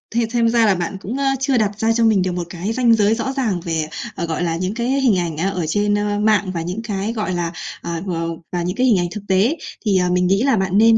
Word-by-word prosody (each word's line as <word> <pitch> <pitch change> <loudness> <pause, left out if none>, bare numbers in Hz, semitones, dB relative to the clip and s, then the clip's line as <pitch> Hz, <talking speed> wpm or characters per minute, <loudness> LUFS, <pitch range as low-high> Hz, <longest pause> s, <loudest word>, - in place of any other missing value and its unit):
thì 235 -1 +2
xem 235 -1 +3
ra 230 -1 +3
là 200 -3 +4
bạn 175 +2 -3
cũng, 235 +7 -4
ơ, 280 - -1 0.2
chưa 265 -1 +1
đặt 210 -2 0
ra 225 +1 +2
cho 230 0 +2
mình 215 -4 +4
được 185 0 0
một 175 0 -2
cái 185 +5 -3
ranh 240 -1 +4
giới 215 0 +3
rõ 265 +4 -2
ràng, 215 -9 0
về, 160 -2 -1 0.3
ờ, 170 - -2
gọi 165 +1 -2
là, 165 -1 0
những 185 +3 -2
cái 235 +2 -2
hình 235 -8 +3
ảnh, 165 -3 -3
a, 190 +4 0
ở 180 -4 -2
trên, 205 +5 +1
ơ, 205 0 -1
mạng 210 -3 +2
và 170 - -2
những 180 +6 -4
cái, 210 0 -2
gọi 215 -5 -2
là, 170 -1 -2 0.3
ờ, 170 -1 -4
v - - -5 0.4
và 175 - -1
những 180 +2 -2
cái 255 +1 +2
hình 205 -7 +4
ảnh 175 - 0
thực 210 - -6
tế. 200 - +2 0.3
Thì, 200 -3 +3
ờ, 180 -1 +2
mình 180 0 +2
nghĩ 195 +5 +2
là 270 -3 +3
bạn 190 0 0
nên 225 +1 +6
205 Hz, 290 wpm, -20 LUFS, 180-225 Hz, 0.4 s, nên